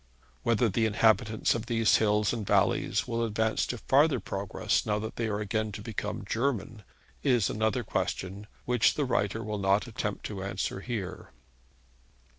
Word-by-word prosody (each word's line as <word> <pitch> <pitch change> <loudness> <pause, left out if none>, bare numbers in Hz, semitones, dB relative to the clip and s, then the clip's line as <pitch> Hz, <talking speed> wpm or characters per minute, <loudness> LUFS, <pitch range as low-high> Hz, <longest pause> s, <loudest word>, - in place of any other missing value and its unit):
Whether 115 - +2
the 110 +2 +1
inhabitants 110 +1 +3
of 115 0 -4
these 115 -2 +4
hills 105 -1 +2
and 115 -3 -3
valleys 100 +1 +1
will 115 -1 -1
advance 110 0 0
to 120 - -3
farther 140 +3 +3
progress 100 -2 -1
now 105 -1 0
that 110 +1 -5
they 115 - -1
are 105 -1 -1
again 110 +1 -1
to 105 - -6
become 110 -3 -4
German, 115 -3 -2 0.4
is 120 -7 +2
another 110 +3 0
question, 95 0 -3 0.2
which 125 -3 +3
the 145 - 0
writer 110 -3 0
will 105 -1 -3
not 100 +2 +2
attempt 105 -3 -4
to 100 -3 -5
answer 95 0 -3
here. 105 -3 -5
110 Hz, 160 wpm, -29 LUFS, 105-115 Hz, 0.4 s, these